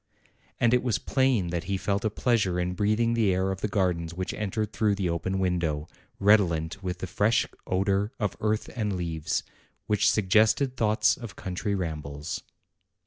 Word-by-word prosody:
And 120 0 +3
it 125 - +4
was 120 -3 0
plain 130 -9 +1
that 85 -1 -2
he 100 +1 -1
felt 100 +1 -1
a 110 - +2
pleasure 105 -5 +1
in 90 0 -1
breathing 110 +4 +1
the 110 -4 +3
air 95 +1 +1
of 95 0 -5
the - - 0
gardens 90 -5 -1
which 95 +1 -3
entered 105 0 -3
through 105 -2 +2
the 95 -4 -1
open 95 +3 -2
window, 85 -5 0 0.3
redolent 95 -4 +3
with 90 -1 -3
the 95 - -4
fresh 105 +5 +2 0.2
odor 100 +3 +1
of 105 -4 -1
earth 110 0 0
and 105 -4 -1
leaves, 80 -3 -2 0.4
which 105 0 +3
suggested 110 +6 +3
thoughts 110 -3 +2
of 115 -7 -8
country 95 +2 -3
rambles. 75 -5 -4
100 Hz, 170 wpm, -27 LUFS, 90-110 Hz, 0.4 s, it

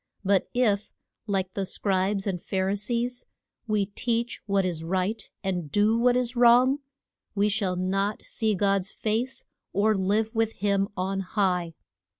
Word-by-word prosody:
But 195 -1 +2
if, 215 -4 +1 0.4
like 190 -2 -1
the 195 - -2
Scribes 195 +1 0
and 185 -4 -2
Phar 190 0 -1
i - - +1
sees, 240 +4 -2 0.4
we 210 -2 +1
teach 235 +4 -2
what 195 -1 +2
is 170 -3 -2
right 185 +5 -1 0.2
and 180 -6 -2
do 210 +4 +3
what 245 +1 +3
is 250 0 -1
wrong, 245 +3 +5 0.6
we 205 +1 +3
shall 200 -3 0
not 195 +3 -1
see 220 -2 0
God's 195 0 +1
face, 240 +5 -2 0.3
or 210 +3 +3
live 205 +3 +1
with 225 0 +1
him 200 0 +1
on 190 +1 -1
high. 180 -4 0
200 Hz, 150 wpm, -26 LUFS, 190-225 Hz, 0.6 s, wrong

